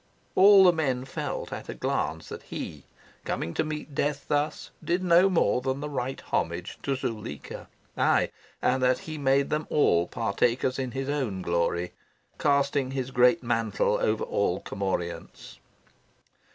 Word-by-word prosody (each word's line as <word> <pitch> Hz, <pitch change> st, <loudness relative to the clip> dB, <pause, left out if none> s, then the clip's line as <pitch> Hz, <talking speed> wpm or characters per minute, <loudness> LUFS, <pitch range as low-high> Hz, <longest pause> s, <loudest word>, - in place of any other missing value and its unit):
All 195 Hz, 0 st, +8 dB
the 180 Hz, -1 st, +7 dB
men 130 Hz, -6 st, -1 dB
felt 135 Hz, -, -4 dB
at -, -, -7 dB
a -, -, -5 dB
glance -, -, -2 dB
that -, -, -7 dB
he, -, -, -7 dB, 0.4 s
coming 85 Hz, -, -3 dB
to -, -, 0 dB
meet 155 Hz, -1 st, -5 dB
death 145 Hz, +1 st, -1 dB
thus, 145 Hz, +1 st, -1 dB
did 175 Hz, +2 st, 0 dB
no 180 Hz, +2 st, +5 dB
more 145 Hz, -, +2 dB
than 130 Hz, +1 st, -2 dB
the 150 Hz, +1 st, -5 dB
right 130 Hz, -1 st, -3 dB
homage 85 Hz, +2 st, -3 dB
to 140 Hz, -, -1 dB
Zuleika 110 Hz, -, -6 dB, 0.3 s
aye, -, -, +2 dB, 0.3 s
and 130 Hz, -, +2 dB
that 125 Hz, 0 st, +3 dB
he 155 Hz, -1 st, -6 dB
made 140 Hz, 0 st, +2 dB
them 155 Hz, 0 st, -1 dB
all 85 Hz, -, +3 dB
partakers 120 Hz, +4 st, 0 dB
in 130 Hz, -1 st, -2 dB
his 135 Hz, 0 st, -3 dB
own 130 Hz, -11 st, -2 dB
glory, 85 Hz, +1 st, 0 dB, 0.5 s
casting 140 Hz, -2 st, +2 dB
his 130 Hz, -1 st, -3 dB
great 125 Hz, +5 st, +4 dB
mantle 115 Hz, -4 st, +1 dB
over 110 Hz, 0 st, +1 dB
all 95 Hz, -3 st, 0 dB
commorients. 95 Hz, -3 st, -4 dB
130 Hz, 150 wpm, -27 LUFS, 110-145 Hz, 0.5 s, All